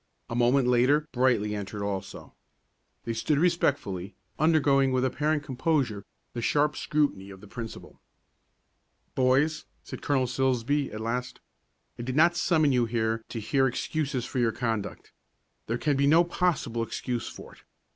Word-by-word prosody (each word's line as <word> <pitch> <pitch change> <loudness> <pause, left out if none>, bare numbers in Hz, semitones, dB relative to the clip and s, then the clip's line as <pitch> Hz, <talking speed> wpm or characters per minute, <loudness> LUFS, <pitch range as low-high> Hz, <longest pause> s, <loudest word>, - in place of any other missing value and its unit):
A - - -2
moment 125 +2 +3
later 130 +5 +3
Brightly 120 -5 +1
entered 100 0 -5
also. 100 -1 -5 0.7
They 115 - -3
stood 140 +6 0
respectfully, 140 - 0 0.2
undergoing 140 -4 +3
with 130 0 +1
apparent 150 +3 0
composure 130 -6 -1 0.3
the 120 - -4
sharp 150 +5 +2
scrutiny 140 -11 -1
of 95 -1 -11
the 105 - -14
principal. 115 +2 -9 1.1
"Boys," 135 +4 +2 0.2
said - - -8
Colonel 135 -3 +1
Silsbee 130 +2 0
at 110 +1 -6
last, 125 +2 -3 0.6
"I - - -3
did 125 +2 -4
not 170 +3 +5
summon 155 -4 +2
you 125 -2 +2
here 110 -1 -1
to 115 - -4
hear 135 +5 +2
excuses 135 0 -2
for 125 - -3
your 120 -2 +2
conduct. 110 -4 -4 0.6
There 115 - -1
can 145 +2 0
be 140 0 +3
no 165 +4 +6
possible 170 -9 -1
excuse 120 +1 -3
for - - -10
it. - - -19
130 Hz, 150 wpm, -27 LUFS, 115-145 Hz, 1.1 s, no